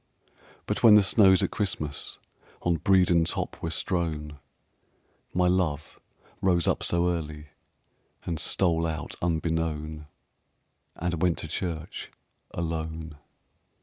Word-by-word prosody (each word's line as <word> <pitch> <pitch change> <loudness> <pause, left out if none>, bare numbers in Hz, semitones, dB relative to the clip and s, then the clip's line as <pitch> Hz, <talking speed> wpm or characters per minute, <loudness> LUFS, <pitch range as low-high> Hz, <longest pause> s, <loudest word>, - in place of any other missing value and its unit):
But - - -2
when 110 -3 +8
the 105 - +7
snows 95 -2 +5
at - - 0
Christmas 75 -8 -3 0.5
On 85 -1 +2
Bredon 90 -2 +4
top 80 - -3
were 80 - -2
strown, 80 -4 -2 0.9
My 90 0 +2
love 85 -5 -1 0.4
rose 90 -3 +2
up - - +1
so 85 0 +1
early 75 -3 -5 0.8
And 85 -3 -2
stole 85 -3 +2
out 80 -2 -4
unbeknown 80 -2 -2 0.9
And 85 -1 -3
went 90 -2 +2
to - - -5
church 80 0 -4 0.4
alone. 80 -2 -4
85 Hz, 115 wpm, -27 LUFS, 80-90 Hz, 0.9 s, when